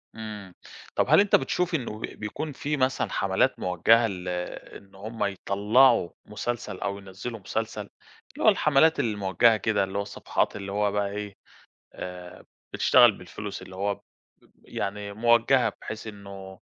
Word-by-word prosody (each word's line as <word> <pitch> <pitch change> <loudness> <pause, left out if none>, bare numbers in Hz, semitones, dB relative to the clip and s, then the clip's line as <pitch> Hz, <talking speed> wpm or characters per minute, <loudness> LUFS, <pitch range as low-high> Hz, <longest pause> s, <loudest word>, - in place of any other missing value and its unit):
إمم. 105 -4 -8 0.4
طَب - - +3
هل 155 - +7
أنت 205 0 +5
بتشوف 175 +6 0
إنه 115 -7 -4
ب - - -13
بيكون 115 +10 -5
في 150 +1 -3
مثلًا 130 0 +1
حملات - - +1
موجهة 110 +6 +4
ل 90 -3 -6 0.5
إن 100 -1 -19
هُم 110 +2 -5
يطلّعوا 100 +3 +3 0.2
مسلسل 110 +3 -4
أو 100 0 -2
ينزّلوا 100 +4 -7
مسلسل؟ 110 +3 -3 0.5
اللي - - -6
هو - - +9
الحملات 150 +2 +4
الموجهة 105 +1 +3
كده، 105 -1 +1
اللي 95 +1 -4
هو - - +1
الصفحات 100 0 -2
اللي 100 0 -6
هو 105 0 +1
بقى 100 0 0
إيه، 105 -1 -6 0.6
آآ، 90 -1 -9 0.3
بتشتغل 120 -2 +6
بالفلوس، 100 +2 -8
اللي 95 - -11
هو 100 +1 -1
ب - - -26 0.6
يعني 100 0 -4
موجهة 120 +3 +3
بحيث 110 +1 -7
إنه 100 -2 -10
105 Hz, 150 wpm, -26 LUFS, 100-120 Hz, 0.6 s, هو